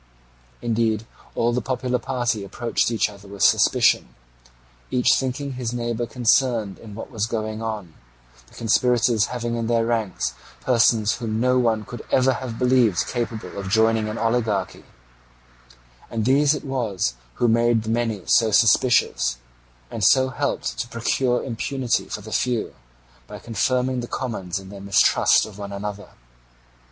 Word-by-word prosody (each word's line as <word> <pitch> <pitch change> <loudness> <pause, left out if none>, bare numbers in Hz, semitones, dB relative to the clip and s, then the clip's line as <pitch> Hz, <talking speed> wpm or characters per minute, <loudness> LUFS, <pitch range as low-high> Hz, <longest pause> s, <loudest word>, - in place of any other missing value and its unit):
Indeed 115 -2 0 0.3
all 120 +1 +1
the 125 - 0
popular 125 +1 -1
party 120 -5 -2
approached 115 +5 -1
each 115 -2 +1
other 100 -1 -13
with 100 -1 -4
suspicion, - - +3 0.7
each 125 - +3
thinking 135 +1 -2
his 125 -2 -4
neighbour 120 -1 -2
concerned 115 -3 +1
in 105 -3 -11
what 115 - -8
was 110 -2 -1
going 110 -1 -3
on, 105 -7 -5 0.5
the - - -20
conspirators 115 -1 +2
having 120 -1 -3
in 115 -1 -2
their 115 -1 +2
ranks 115 -4 -1 0.3
persons 110 -3 +3
whom 110 -3 -3
no 125 +1 +3
one 110 -3 +1
could 120 - -8
ever 130 0 +4
have 125 -3 -6
believed 125 -7 +3
capable 120 -3 -4
of 95 -1 -5
joining 110 +1 +2
an 105 - -5
oligarchy; 115 -4 -1 1.2
and 110 -2 -2
these 140 +3 +4
it 150 - -7
was 110 - -1 0.2
who 120 - +1
made 115 0 +3
the 110 - -5
many 115 -4 -1
so 115 -2 +4
suspicious, 105 - +3 0.5
and 115 - -4
so 130 +6 +5
helped 130 - -3
to - - -2
procure 120 +2 0
impunity 125 0 -1
for - - -5
the - - -10
few, 125 -3 -1 0.5
by - - -8
confirming 125 +3 -1
the 120 - -5
commons 100 -10 -4
in 95 -1 -9
their 100 0 -10
mistrust 100 -1 +4
of 105 -2 -12
one 100 -1 -6
another. 100 0 -6
115 Hz, 150 wpm, -23 LUFS, 110-125 Hz, 1.2 s, so